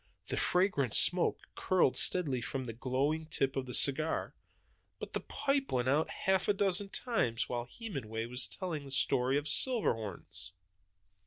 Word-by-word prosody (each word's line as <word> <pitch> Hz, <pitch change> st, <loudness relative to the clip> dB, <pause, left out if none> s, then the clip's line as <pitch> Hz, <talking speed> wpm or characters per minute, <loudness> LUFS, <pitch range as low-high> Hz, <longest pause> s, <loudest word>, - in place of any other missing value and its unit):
The -, -, -2 dB
fragrant 180 Hz, -, +1 dB
smoke 180 Hz, 0 st, +5 dB, 0.2 s
curled 180 Hz, -8 st, +1 dB
steadily 145 Hz, -9 st, +3 dB
from 130 Hz, +3 st, -4 dB
the 115 Hz, -2 st, -6 dB
glowing 140 Hz, +7 st, -2 dB
tip 135 Hz, -3 st, -2 dB
of 130 Hz, -1 st, -3 dB
the 125 Hz, -, -6 dB
cigar; 155 Hz, +3 st, +2 dB, 0.6 s
but -, -, -8 dB
the -, -, -1 dB
pipe 275 Hz, -1 st, -2 dB
went 125 Hz, -1 st, 0 dB
out 150 Hz, +4 st, +1 dB, 0.2 s
half 190 Hz, -1 st, +2 dB
a 205 Hz, -, +3 dB
dozen 195 Hz, 0 st, 0 dB
times 125 Hz, -, -1 dB
while 120 Hz, -1 st, -3 dB
Hemenway 120 Hz, -, -5 dB
was 125 Hz, +2 st, -3 dB
telling 170 Hz, -6 st, -5 dB
the -, -, -10 dB
story 135 Hz, 0 st, +2 dB
of 145 Hz, -, -3 dB
Silverhorns. 110 Hz, -, -1 dB
140 Hz, 155 wpm, -32 LUFS, 125-185 Hz, 0.6 s, smoke